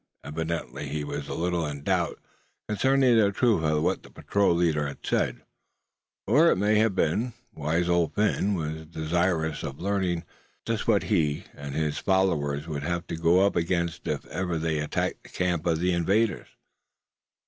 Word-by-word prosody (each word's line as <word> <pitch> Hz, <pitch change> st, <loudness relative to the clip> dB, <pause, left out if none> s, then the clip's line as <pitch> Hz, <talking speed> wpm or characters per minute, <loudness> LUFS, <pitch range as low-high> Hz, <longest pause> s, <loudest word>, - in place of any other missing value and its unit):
Evidently 80 Hz, -1 st, -4 dB
he 75 Hz, +1 st, -3 dB
was 75 Hz, -, -5 dB
a -, -, -4 dB
little 85 Hz, 0 st, 0 dB
in 70 Hz, -2 st, -5 dB
doubt -, -, 0 dB, 0.5 s
concerning 130 Hz, +3 st, +3 dB
the 105 Hz, -3 st, +4 dB
truth 110 Hz, -5 st, +2 dB
of 75 Hz, -1 st, +1 dB
what -, -, +1 dB
the -, -, -15 dB
patrol 100 Hz, -4 st, +1 dB
leader 80 Hz, -4 st, +1 dB
had 70 Hz, -, -9 dB
said; -, -, 0 dB, 0.8 s
or 150 Hz, -, +5 dB
it -, -, +4 dB
may 105 Hz, +2 st, +3 dB
have 110 Hz, -3 st, +2 dB
been, 110 Hz, +10 st, +1 dB, 0.2 s
wise 80 Hz, +3 st, 0 dB
Old 85 Hz, -3 st, +1 dB
Phin 105 Hz, -1 st, +1 dB
was 80 Hz, -1 st, -4 dB
desirous 80 Hz, 0 st, 0 dB
of 70 Hz, -, -6 dB
learning 95 Hz, -3 st, -1 dB, 0.4 s
just 115 Hz, -2 st, -2 dB
what 105 Hz, -4 st, +3 dB
he 75 Hz, -8 st, +1 dB
and 70 Hz, -1 st, -7 dB
his 75 Hz, -1 st, -1 dB
followers 80 Hz, -6 st, +1 dB
would 75 Hz, -3 st, -3 dB
have 85 Hz, +3 st, -2 dB
to -, -, -4 dB
go 85 Hz, +4 st, +4 dB
up 100 Hz, -, +1 dB
against 85 Hz, 0 st, -1 dB
if -, -, -2 dB
ever 90 Hz, -3 st, -2 dB
they 80 Hz, -1 st, -1 dB
attacked 75 Hz, 0 st, -2 dB
the -, -, -16 dB
camp 90 Hz, -2 st, -1 dB
of 80 Hz, -2 st, +2 dB
the 90 Hz, +1 st, +1 dB
invaders. 95 Hz, +5 st, +1 dB
85 Hz, 170 wpm, -27 LUFS, 80-100 Hz, 0.8 s, or